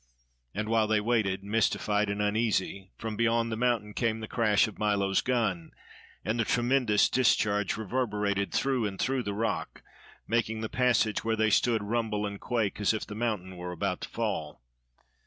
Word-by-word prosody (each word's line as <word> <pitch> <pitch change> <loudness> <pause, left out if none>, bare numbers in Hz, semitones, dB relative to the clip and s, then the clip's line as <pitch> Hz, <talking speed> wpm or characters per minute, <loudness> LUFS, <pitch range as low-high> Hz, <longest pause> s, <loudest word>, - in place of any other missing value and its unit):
And 105 +1 -2
while 110 -1 +2
they 110 0 +3
waited, 105 -4 0
mystified 105 0 +1
and 100 +1 -1
uneasy, 105 -3 0
from 110 -1 -4
beyond 115 +1 +1
the - - -1
mountain 115 -3 0
came 115 -1 0
the 110 - -6
crash 110 -3 +3
of 110 - -10
Milo's 100 -2 +2
gun, 110 -10 -1 0.5
and 110 +2 -1
the - - +3
tremendous 120 -2 +3
discharge 105 -6 +2
reverberated 105 -4 -1
through 130 -1 +1
and 95 -1 -6
through 135 -1 0
the 100 -4 -4
rock, 110 0 -3 0.4
making 110 -1 0
the 110 - -3
passage 125 -4 +2
where 115 0 +1
they 110 0 +2
stood 115 0 +2
rumble 110 -1 -1
and 100 -1 -6
quake 110 -4 -1
as 105 +2 +3
if 110 - -4
the - - -8
mountain 105 -5 -3
were 90 0 -5
about 90 +1 -2
to - - -6
fall. 100 - -3
110 Hz, 175 wpm, -29 LUFS, 100-115 Hz, 0.5 s, they